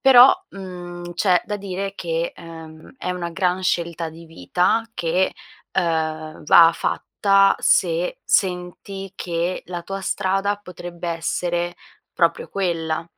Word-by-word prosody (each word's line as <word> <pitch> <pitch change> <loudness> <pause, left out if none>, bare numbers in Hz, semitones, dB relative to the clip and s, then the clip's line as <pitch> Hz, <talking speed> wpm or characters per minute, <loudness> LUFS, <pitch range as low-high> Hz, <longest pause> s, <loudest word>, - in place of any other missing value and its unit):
Però, 265 -1 +9 0.2
mhmm, 175 -2 -8
c'è 180 -1 +3
da 210 0 -3
dire 195 0 -4
che, 170 -2 -2
ehm, 160 +1 -11
è 180 - -3
una 175 -1 -3
gran 180 +1 0
scelta 170 -2 -1
di 165 +1 -12
vita 180 - 0
che, 175 +3 +1 0.4
ehm, 160 -3 -1
va 165 +1 +8
fatta 195 +3 +2
se - - +2
senti 190 +1 -1
che 175 +1 -2
la 175 -1 -5
tua 195 +2 -5
strada 195 +1 0
potrebbe 175 -3 -8
essere 175 +1 -1 0.4
proprio 485 - +1
quella. 165 -4 -1
180 Hz, 125 wpm, -22 LUFS, 170-195 Hz, 0.4 s, Però